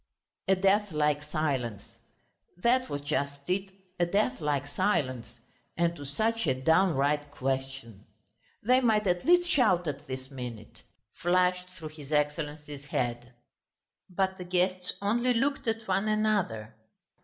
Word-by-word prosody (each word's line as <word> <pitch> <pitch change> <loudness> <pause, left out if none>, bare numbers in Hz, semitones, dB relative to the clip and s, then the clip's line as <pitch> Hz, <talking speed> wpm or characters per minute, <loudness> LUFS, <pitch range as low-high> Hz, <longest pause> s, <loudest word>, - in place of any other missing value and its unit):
A 190 - +5
deathlike 185 -7 +2
silence. 140 -9 -3 0.6
That 250 +6 +2
was 145 - -3
just 140 -1 -2
it, 190 +1 -1 0.3
a 175 - +4
deathlike 160 - 0
silence, 130 - -1 0.4
and 170 0 +2
to 145 -3 -8
such 225 +6 0
a 130 - +2
downright 150 -2 +2
question. 135 -6 -4 0.6
"They 250 +4 +4
might 220 -4 +3
at 175 -2 +1
least 350 +1 +5
shout 215 - +3
at 145 -3 -5
this 130 +1 -6
minute!" 120 -5 -8 0.3
flashed 180 +1 +1
through 160 -3 -7
his 150 -2 -12
Excellency's 150 -1 -2
head. 120 -2 -2 0.8
But 190 +1 -1
the - - -4
guests 180 0 0
only 240 +4 +2
looked 275 +2 0
at 225 0 -1
one 195 +2 +1
another. 205 - 0
165 Hz, 130 wpm, -29 LUFS, 140-195 Hz, 0.8 s, A